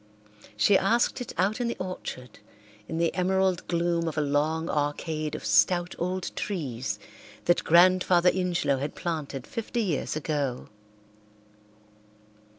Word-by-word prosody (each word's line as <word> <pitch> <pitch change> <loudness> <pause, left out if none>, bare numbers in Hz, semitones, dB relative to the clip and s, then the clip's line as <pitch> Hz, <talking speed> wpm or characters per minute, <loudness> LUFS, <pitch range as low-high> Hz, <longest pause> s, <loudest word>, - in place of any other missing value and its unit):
She 190 - +5
asked 235 +5 +1
it 245 - -5
out 205 +6 +1
in 240 - 0
the 235 - -3
orchard, 155 - -7 0.5
in 160 - -4
the 170 0 +1
emerald 190 0 +1
gloom 170 -1 0
of 160 - -4
a - - +3
long 150 +3 0
arcade 150 +1 -2
of - - -7
stout 175 - +3
old 180 +1 -3
trees 135 - -3 0.5
that 175 - +3
Grandfather 180 +1 +5
Ingelow 180 -7 0
had 145 +2 -4
planted 150 -6 -4
fifty 230 +1 -3
years 170 -8 -2
ago. 145 -5 -2
170 Hz, 130 wpm, -27 LUFS, 145-185 Hz, 0.5 s, She